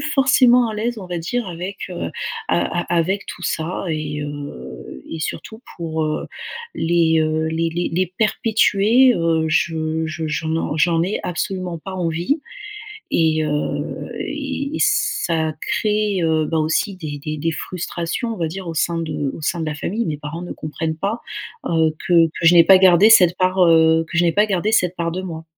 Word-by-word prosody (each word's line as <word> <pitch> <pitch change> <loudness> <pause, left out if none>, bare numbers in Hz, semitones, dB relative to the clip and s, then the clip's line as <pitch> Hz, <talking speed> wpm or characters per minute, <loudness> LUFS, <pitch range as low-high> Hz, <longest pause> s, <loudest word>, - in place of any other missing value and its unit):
forcément 250 -3 +5
à 215 - -4
l'aise, 230 +2 -2
on 185 - -8
va 175 -1 -3
dire, 230 +7 -2
avec, 180 +3 -6
heu, 130 - -4 0.4
a 90 - +2 0.2
a 175 - -3
avec 190 +5 0
tout 180 - -8
ça 165 +3 -2
et, 150 -2 -3
heu, 65 - -8
et 165 - -5
surtout 220 +9 -6
pour, 160 -2 -2
heu, 155 0 -2 0.5
les, 160 -1 +2
heu, 155 0 0
les 165 +1 0
les 175 +1 -2
les 185 +1 0
perpétuer, 220 +3 +3
heu, 165 -1 +1
je 160 0 0
je 160 0 -4
je 155 +1 -2
n'en 160 -1 -1
j'en 165 +2 +2
ai 190 +4 -1
absolument 180 -1 -3
pas 190 +4 -8
envie 175 - -1 0.7
et, 160 -1 +2
heu, 150 -1 -3
et 285 0 -4
ça 160 -3 +1
crée, 210 -3 0
heu, 160 -1 +2
bah 160 - -1
aussi 160 +6 0
des 150 -4 -6
des 155 0 -3
des 160 +2 -1
frustrations, 180 - -4
on - - -10
va 165 - 0
dire, 185 +1 -7
au 165 - -4
sein 170 +1 0
de 150 -4 -3
au - - -9
sein 170 +3 -1
de 160 - -2
la 155 - -2
famille. 210 +10 -2
Mes 150 -2 -3
parents 150 +4 -6
ne 180 - -6
comprennent 160 +1 -4
pas, 200 +7 -2 0.5
heu, 160 -2 +2
que 170 -2 +5
que 165 +1 -3
je 175 - +7
n'ai 170 -1 +8
pas 190 +2 +8
gardé 190 +3 +6
cette 180 -5 +6
part, 185 +1 +1
heu, 160 0 +5
que 170 - -3
je 175 - +4
n'ai 170 - +3
pas 210 +3 +3
gardé 200 +2 0
cette 180 -5 +2
part 170 0 -1
de 185 - -4
moi. 165 -3 -7
170 Hz, 190 wpm, -20 LUFS, 160-190 Hz, 0.7 s, n'ai